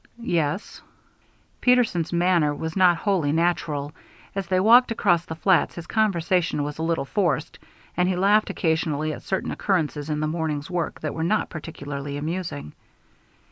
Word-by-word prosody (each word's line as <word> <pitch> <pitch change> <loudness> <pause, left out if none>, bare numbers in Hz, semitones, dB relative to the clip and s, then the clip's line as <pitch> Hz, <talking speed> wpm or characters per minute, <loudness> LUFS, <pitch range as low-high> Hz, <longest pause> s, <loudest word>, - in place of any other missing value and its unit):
"Yes." 160 +4 -1 0.8
Peterson's 235 -10 +2
manner 170 -4 +2
was 160 +1 -5
not 180 -3 +5
wholly 175 -7 0
natural. 155 -3 0 0.4
As 195 -2 -3
they 185 +1 +2
walked 235 +6 +6
across 175 -7 +1
the 160 - -6
flats 180 +2 +2
his 170 - -7
conversation 180 -6 +1
was 145 +1 -5
a - - -2
little 165 -3 0
forced, 190 +4 -1 0.4
and 180 +1 +2
he 185 - 0
laughed 205 +4 +3
occasionally 155 -2 -1
at - - -8
certain 190 - -2
occurrences 155 -6 -1
in 150 -1 -1
the 155 - 0
morning's 155 0 -3
work 175 -2 -3
that 155 - -3
were 160 - -3
not 210 +6 0
particularly 145 -3 -6
amusing. 155 - -4
170 Hz, 155 wpm, -24 LUFS, 155-185 Hz, 0.8 s, walked